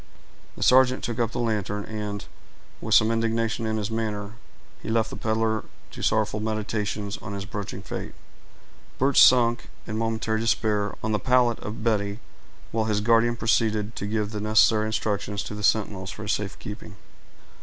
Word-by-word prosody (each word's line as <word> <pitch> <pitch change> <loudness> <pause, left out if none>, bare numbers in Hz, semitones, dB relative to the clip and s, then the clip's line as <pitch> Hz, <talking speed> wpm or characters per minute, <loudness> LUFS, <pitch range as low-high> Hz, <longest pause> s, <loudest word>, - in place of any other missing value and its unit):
The - - -3
sergeant 130 0 +5
took 120 0 -3
up 115 - +1
the - - -5
lantern, 105 -3 -1
and, 105 -2 -5 0.6
with - - +2
some 110 +1 +5
indignation 115 0 0
in 110 0 -1
his 105 +1 -3
manner, 105 -2 -3 0.5
he - - -6
left 110 -1 +1
the - - -6
peddler 110 0 0 0.3
to - - -9
sorrowful 110 -1 +1
meditations 105 -1 -2
on 105 - -7
his 100 -1 -4
approaching 100 -1 -6
fate. - - -6 0.8
Birch 135 +1 +4
sank, 120 -2 +4 0.2
in 110 0 -3
momentary 110 -1 -1
despair, 105 -3 0
on 110 - -1
the 105 - +1
pallet 125 -2 +3
of 110 +1 -6
Betty, 105 -2 0 0.5
while 110 -1 0
his 105 -2 +1
guardian 115 +2 +3
proceeded 110 -1 +1
to 100 - -3
give 105 -1 -1
the 105 -2 -4
necessary 110 0 +4
instructions 105 -2 -2
to - - -7
the 105 - -6
sentinels 100 -3 +1
for 105 - -7
his 105 - -1
safe 105 -1 -2
keeping. 105 -1 -9
110 Hz, 170 wpm, -25 LUFS, 105-115 Hz, 0.8 s, sergeant